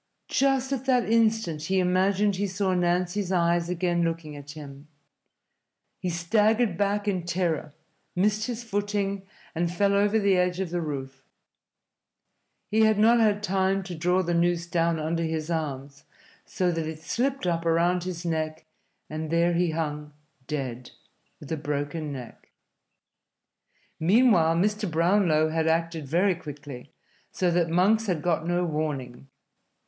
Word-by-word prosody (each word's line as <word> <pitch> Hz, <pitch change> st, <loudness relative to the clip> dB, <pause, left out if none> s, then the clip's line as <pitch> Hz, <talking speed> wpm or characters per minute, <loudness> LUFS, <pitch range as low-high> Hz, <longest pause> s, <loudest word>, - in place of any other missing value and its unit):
Just 270 Hz, 0 st, +1 dB
at 265 Hz, -1 st, -3 dB
that 250 Hz, -3 st, +2 dB
instant 220 Hz, -9 st, +1 dB
he 190 Hz, +3 st, 0 dB
imagined 190 Hz, +2 st, +2 dB
he 200 Hz, +1 st, 0 dB
saw 190 Hz, 0 st, -1 dB
Nancy's 180 Hz, +2 st, 0 dB
eyes 170 Hz, -1 st, +2 dB
again 175 Hz, -1 st, 0 dB
looking 165 Hz, -3 st, -2 dB
at 145 Hz, 0 st, -11 dB
him. 145 Hz, -1 st, -10 dB, 1.1 s
He 180 Hz, -, -2 dB
staggered 210 Hz, +5 st, +2 dB
back 205 Hz, +2 st, 0 dB
in 185 Hz, -4 st, 0 dB
terror, 170 Hz, -4 st, -1 dB, 0.4 s
missed 210 Hz, +4 st, +1 dB
his 240 Hz, -1 st, -4 dB
footing, 205 Hz, -2 st, -2 dB, 0.3 s
and 170 Hz, +1 st, -1 dB
fell 200 Hz, +3 st, +2 dB
over 205 Hz, +2 st, +3 dB
the 200 Hz, -3 st, +3 dB
edge 180 Hz, 0 st, +1 dB
of 190 Hz, -3 st, -3 dB
the 175 Hz, -1 st, -1 dB
roof. 135 Hz, -3 st, -6 dB, 1.5 s
He 220 Hz, +1 st, +3 dB
had 220 Hz, -1 st, +4 dB
not 230 Hz, +3 st, +5 dB
had 210 Hz, -2 st, +2 dB
time 195 Hz, 0 st, +1 dB
to 185 Hz, -1 st, -7 dB
draw 180 Hz, +3 st, +1 dB
the 175 Hz, 0 st, -1 dB
noose 170 Hz, 0 st, +1 dB
down 170 Hz, -1 st, +1 dB
under 160 Hz, +2 st, -2 dB
his 160 Hz, 0 st, -2 dB
arms, 140 Hz, -3 st, -4 dB, 0.4 s
so 180 Hz, -1 st, 0 dB
that 165 Hz, -2 st, -2 dB
it 160 Hz, 0 st, -7 dB
slipped 265 Hz, +3 st, -1 dB
up 170 Hz, -2 st, 0 dB
around 170 Hz, +2 st, +2 dB
his 175 Hz, -1 st, -5 dB
neck, 155 Hz, -1 st, -2 dB, 0.4 s
and 155 Hz, 0 st, -5 dB
there 170 Hz, +1 st, +2 dB
he 175 Hz, 0 st, +1 dB
hung, 150 Hz, -2 st, -4 dB, 0.3 s
dead, 125 Hz, -5 st, -4 dB, 0.5 s
with 145 Hz, -, -11 dB
a 160 Hz, -, -1 dB
broken 145 Hz, +1 st, -3 dB
neck. 125 Hz, -4 st, -9 dB, 1.5 s
Meanwhile 180 Hz, -3 st, +4 dB
Mr. 210 Hz, +3 st, 0 dB
Brownlow 165 Hz, -1 st, +3 dB
had 160 Hz, 0 st, 0 dB
acted 165 Hz, -2 st, 0 dB
very 180 Hz, +6 st, +2 dB
quickly, 145 Hz, -6 st, -9 dB, 0.4 s
so 180 Hz, -2 st, 0 dB
that 170 Hz, -1 st, +1 dB
Monks 205 Hz, +6 st, +3 dB
had 170 Hz, -6 st, -1 dB
got 165 Hz, -2 st, 0 dB
no 175 Hz, 0 st, +1 dB
warning. 145 Hz, -5 st, -4 dB
175 Hz, 150 wpm, -26 LUFS, 160-200 Hz, 1.5 s, not